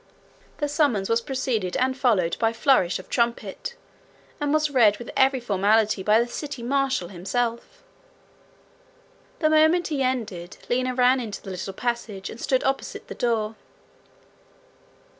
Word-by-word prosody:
The 295 - -1
summons 285 -10 +1
was 230 +1 +3
preceded 230 -8 -2
and 260 0 +1
followed 210 -11 +2
by 225 -1 +2
flourish 230 -7 +3
of - - -11
trumpet, 235 - -2 0.6
and 290 -1 -1
was 305 -1 +2
read 220 -6 +5
with 240 - -8
every 265 0 +3
formality 210 -1 +2
by 210 +3 +4
the 235 - +2
city 275 -1 -6
marshal 265 -7 0
himself. 225 +6 -3 1.6
The 310 - +4
moment 315 +3 +4
he 290 -3 -1
ended, 215 -9 -2
Lina 255 +1 0
ran 255 +1 +4
into 220 -4 -5
the 195 - -7
little 185 +1 -5
passage, 225 -4 -3
and 225 - -10
stood 260 -1 +1
opposite 270 0 -3
the - - -5
door. 225 -2 -1
240 Hz, 140 wpm, -24 LUFS, 210-270 Hz, 1.6 s, read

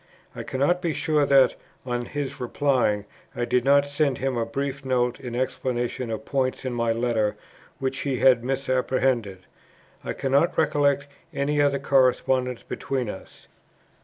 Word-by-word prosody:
I - - -5
cannot 145 +7 0
be 170 -3 -1
sure 150 -2 +1
that, 135 -2 +5 0.3
on 120 -1 -2
his 140 0 -5
replying, 125 -5 +1 0.3
I 120 - -1
did 125 0 +1
not 140 +1 +4
send 140 -2 0
him 135 0 -1
a 115 -1 -1
brief 140 +3 -3
note 125 -1 0
in 125 -3 -6
explanation 125 -1 -2
of 110 - -4
points 130 -1 -1
in 130 - -2
my 115 -1 0
letter 115 -2 0 0.4
which 135 0 -2
he 135 -3 -1
had 125 -1 +4
misapprehended. 130 -6 0 0.6
I - - -3
cannot 140 +5 +1
recollect 145 -2 +2 0.3
any 145 +1 +1
other 140 -1 +2
correspondence 130 -2 +2
between 130 -5 -3
us. 95 - -12
130 Hz, 150 wpm, -25 LUFS, 120-140 Hz, 0.6 s, that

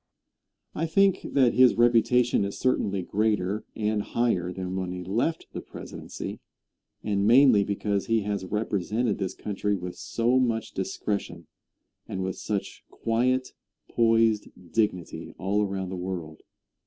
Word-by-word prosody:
I 165 - -1
think 195 +3 +3
that 130 -4 +4
his 130 -1 +6
reputation 120 0 +4
is 100 0 -4
certainly 100 -7 0
greater 105 0 0
and 105 -1 0
higher 100 -6 0
than 95 0 -4
when 95 -1 -2
he 90 0 -5
left 120 - -1
the - - -4
presidency, - - -8 0.6
and 100 -1 +1
mainly 125 -3 +6
because 100 0 -1
he 115 -1 +2
has 100 -1 -2
represented 105 +2 -1
this 95 -1 -3
country 105 0 -2
with 90 -1 -6
so 120 +2 +1
much 115 -3 0
discretion 95 -3 -3 0.6
and 95 - -3
with 95 0 -2
such 100 -2 -4
quiet, 130 +3 0 0.4
poised 115 -2 +3 0.2
dignity 105 -6 -1
all 95 +4 0
around 95 -2 -3
the 95 - -4
world. 90 -4 -5
105 Hz, 135 wpm, -27 LUFS, 95-115 Hz, 0.6 s, his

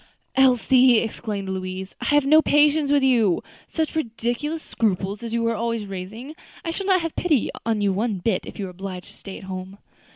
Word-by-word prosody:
"Elsie," 255 -1 +5
exclaimed 215 -3 -3
Louise, 190 0 -5
"I - - -3
have 290 -1 +3
no 310 +3 +6
patience 295 -1 +3
with 285 -1 +4
you! 230 -9 +3 0.2
such 320 -1 -2
ridiculous 250 +4 -2
scruples 200 -1 -1
as 230 -1 -5
you 230 0 0
are 230 - +1
always 230 -1 -2
raising. 200 +9 -7 0.3
I 330 - -1
shall 390 +3 -4
not 355 -4 +1
pity 305 -9 +1 0.2
you 205 -2 +1
one 210 +1 -1
bit, 185 +1 -1
if - - -9
you 200 - -3
are 185 - -7
obliged 185 0 -7
to - - -17
stay 195 - -8
at - - -12
home." 190 +1 -7
230 Hz, 190 wpm, -23 LUFS, 195-285 Hz, 0.3 s, no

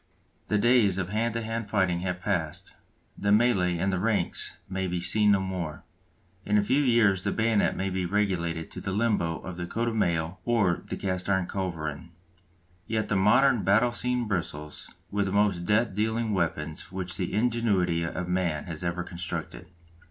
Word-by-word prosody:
The 105 - +2
days 110 -4 +4
of 90 -2 -2
hand 115 +2 -1
to 115 - -2
hand 115 -1 -4
fighting 95 -4 +1
have 90 0 -3
passed, 90 -6 -2 0.4
the 100 - -2
mêlée 100 -5 +3
in 95 +4 0
the 95 - 0
ranks 100 -3 -1
may 95 0 -2
be 90 0 -2
seen 105 +4 +3
no 100 -1 +5
more; 90 -5 -4 0.6
in 105 +1 +2
a 105 - +3
few 130 +7 +2
years 115 -8 +3
the - - 0
bayonet 110 -2 +2
may 95 0 -2
be 90 -1 -1
relegated 85 -4 -1
to - - -7
the 95 - -3
limbo 105 -6 +1
of 90 -2 -7
the 85 -1 -4
coat 115 +5 -1
of 115 - -4
mail 85 -3 0
or 105 -7 +2
the - - -4
cast 95 -1 -2
iron 95 -2 +2
culverin. 85 -4 -4 0.8
Yet 110 -1 -1
the 105 - +1
modern 120 +5 +4
battle 110 +5 +4
scene 125 0 -1
bristles 75 -6 -4 0.2
with 100 0 0
the - - -2
most 100 -3 +2
death 105 +2 +2
dealing 110 +2 0
weapons 80 -4 -2
which 95 -1 -4
the 90 - -2
ingenuity 105 -7 +1
of 85 +2 -3
man 90 -4 0
has 85 -1 -6
ever 90 0 -1
constructed. 85 -9 -6
95 Hz, 180 wpm, -27 LUFS, 90-110 Hz, 0.8 s, no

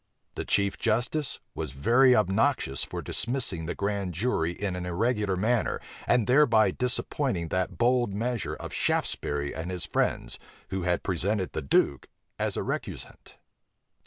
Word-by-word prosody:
The - - -4
chief 100 0 +1
justice 125 +6 0
was 75 -4 -5
very 125 - +5
obnoxious 105 - +1
for - - -5
dismissing 110 -9 -1
the - - -3
grand 100 -3 -2
jury 85 -5 0
in 95 +1 -3
an 90 - -4
irregular 100 +2 0
manner, 115 +5 +1 0.3
and 120 -3 +3
thereby 125 -4 +5
disappointing 125 - -1
that 90 +1 -1
bold 120 -1 +2
measure 115 +2 -2
of - - -8
Shaftesbury 70 -1 -1
and 80 +3 -5
his 90 -2 -3
friends, - - -1 0.3
who 95 0 -1
had 90 0 0
presented 95 +2 0
the 80 - -3
duke 70 -1 +1 0.3
as - - -1
a - - -1
recusant. - - -6
100 Hz, 145 wpm, -28 LUFS, 90-120 Hz, 0.3 s, very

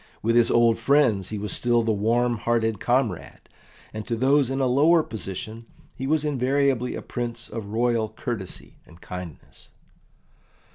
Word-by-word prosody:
With 115 +2 +2
his 120 -1 +5
old 115 -1 +3
friends 115 -7 +2
he 110 - -4
was 105 +1 -3
still 120 -1 +2
the 115 - +1
warm 115 +3 +1
hearted 115 -2 0
comrade, 120 -7 -1 0.5
and 110 -1 -6
to 115 - -1
those 135 +2 +3
in 135 0 -2
a 135 - +2
lower 155 +6 +4
position 110 +1 -7 0.3
he 130 - -5
was 155 +1 +1
invariably 135 -2 +1
a - - -6
Prince 120 -1 -5
of 110 -2 -6
royal 115 0 0
courtesy 110 -5 -6
and 80 - -17
kindness. 90 -4 -10
120 Hz, 155 wpm, -24 LUFS, 110-130 Hz, 0.5 s, his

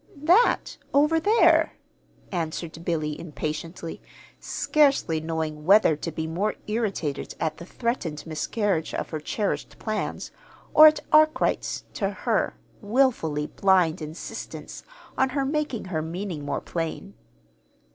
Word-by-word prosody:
"That 365 +10 +3 0.2
over 300 +3 +4
there," 425 +8 +4 0.6
answered 165 -2 -4
Billy, 155 -3 -2
impatiently, 165 +1 -5 0.4
scarcely 275 - +2
knowing 160 -1 -3
whether 195 -2 +5
to 165 +3 -5
be 160 +1 -3
more 180 +7 -1
irritated 210 -10 -2
at 155 -1 -1
the 170 - -10
threatened 190 -12 -3
miscarriage 165 +2 -1
of - - -4
her 155 - -3
cherished 200 +7 -3
plans, 215 -1 -3 0.4
or 310 0 +10
at 305 -1 +3
Arkwright's 310 0 +3
(to - - -1
her) - - -1 0.3
wilfully 205 - +1
blind 180 -3 +2
insistence 155 +2 -7 0.4
on 265 - +3
her 275 - +1
making 290 -6 -2
her 170 -4 -2
meaning 170 -1 -5
more - - -2
plain. 165 - -4
175 Hz, 120 wpm, -25 LUFS, 160-240 Hz, 0.6 s, or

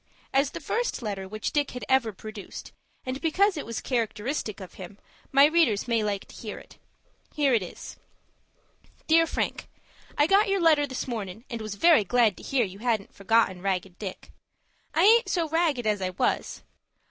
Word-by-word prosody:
As 275 +1 +3
the - - -7
first 475 - -2
letter 200 -3 -4
which 215 +2 -4
Dick 290 -2 +1
had - - -6
ever 260 -4 +2
produced, 215 0 -9 0.3
and 255 +1 -4
because 375 +5 +2
it 295 - -5
was 230 - -4
characteristic 230 -1 -2
of 190 -2 -10
him, 190 +1 -10 0.3
my 275 +1 +7
readers 295 -10 +2
may 230 -2 +1
like 205 -2 -2
to 215 -3 -8
read - - -10
it. - - -19 0.6
Here 285 -3 +2
it 225 - +3
is,— 180 - -9 1.1
"DEAR 330 +1 +4
FRANK,—I 290 - -3
got 395 +5 +4
your 395 0 +2
letter 310 -4 +4
this 260 -1 -5
mornin', 220 -2 -5
and 230 -1 -4
was 215 -2 -5
very 320 0 +5
glad 225 -1 +3
to - - -11
hear 260 -4 +1
you 195 +1 -10
hadn't 225 -4 -1
forgotten 200 -2 +1
Ragged 185 -2 -2
Dick. 195 -3 -7 0.6
I - - +4
aint 460 +4 +6
so 335 -3 0
ragged 310 -6 +1
as 210 -2 +1
I 185 - -1
was. 180 - -2
235 Hz, 180 wpm, -26 LUFS, 205-295 Hz, 1.1 s, my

